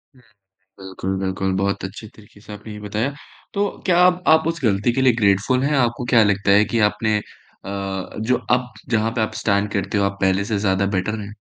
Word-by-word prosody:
हुँ। 130 - -21 0.6
बिल्कुल, 95 0 -4
बिल्कुल। 95 0 -2
बहुत 100 0 -1
अच्छे 100 +3 -7
तरीके 105 -1 -18
से 105 - -12
आपने 105 +1 -9
ये 105 - -9
बताया, 105 +6 -2 0.4
तो 200 0 +1 0.2
क्या 175 -2 +3
आप 180 0 +1
आप 160 0 +5
उस 165 0 -3
गलती 105 +2 +2
के 130 - -1
लिए 130 -2 +5
ग्रेटफुल 105 +4 +2
हैं? 145 +1 +1
आपको 120 -1 0
क्या 115 - +7
लगता 100 -1 +1
है 100 +2 +6
कि 115 - +1
आपने 110 +1 -1 0.5
अ, 100 - -6 0.5
जो 125 +3 +1
अब 125 -1 +1 0.2
जहाँ 110 -1 +1
पे - - +1
आप 110 - -1
स्टैंड 100 -1 +1
करते 100 +1 -1
हो, 100 - +2
आप 100 0 -2
पहले 95 +1 +2
से 105 0 -2
ज़्यादा 100 -1 +1
बेटर 105 +4 -2
है? 100 0 -8
105 Hz, 215 wpm, -21 LUFS, 100-120 Hz, 0.6 s, क्या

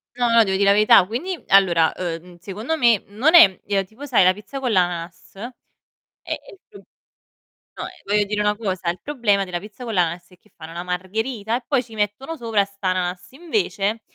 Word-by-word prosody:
No, 245 -1 +1
no, 230 -1 +6
devo 190 -2 -1
dì 200 - +1
la 200 - +5
verità. 205 -2 +6
Quindi, 320 - -4
allora, 175 -5 +4
ehm, 175 0 -6
secondo 215 - -4
me 235 -6 +3
non 250 - +2
è 195 - +7
ehm, 195 -1 0
tipo 225 +9 -11
sai 250 -8 +3
la 185 +1 +5
pizza 215 +7 -9
con 250 -3 -2
l'ananas? 175 -3 -2
È 235 +5 -12 0.5
è - - -10
il 390 - -16
pro 415 - -14 1.0
no, - - -5
ehm, - - -6 0.2
voglio 205 +1 +1
dire 210 +1 -2
una 210 0 +1
cosa: 190 -5 -3
il 175 - -3
problema 225 -9 0
della 180 -2 -4
pizza 210 +6 -12
con 230 -2 -5
l'ananas 175 -1 -1
è 180 - -20
che - - -30
fanno 160 +1 -11
la 175 +1 -5
margherita, 215 +5 -3
e 255 - -11
poi 270 -4 +1
ci 225 -1 -16
mettono 210 +9 -3
sopra 225 -7 0
st'ananas. 185 -2 -3
Invece 265 - -2
205 Hz, 205 wpm, -21 LUFS, 185-235 Hz, 1.0 s, è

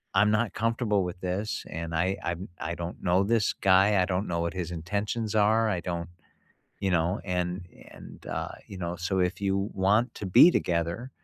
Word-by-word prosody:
"I'm 105 +1 +5
not 105 +1 +1
comfortable 115 -3 +1
with 90 0 -5
this, 95 +4 -2
and 80 0 -5
I 90 +4 +1
I 85 - -1 0.2
I 85 +1 -3
don't 85 0 -6
know 90 +2 +3
this 110 +2 +2
guy, 95 +1 +4
I - - +3
don't 95 +2 -1
know 85 -1 -1
what 85 0 -2
his 90 -2 -4
intentions 105 +6 -3
are, 110 +2 +3
I 90 -4 0
don't," 85 -2 -4 0.7
you 95 - 0
know, 90 +3 +1
and 90 0 -2 0.3
and, - - -13
uh, - - -3 0.2
you 100 - -9
know, 85 -1 -3
"So 90 +2 -1
if 90 +1 0
you 100 +1 0
want 105 +6 +2
to 100 - -5
be 95 - +8
together," 85 - -1
95 Hz, 190 wpm, -27 LUFS, 90-105 Hz, 0.7 s, be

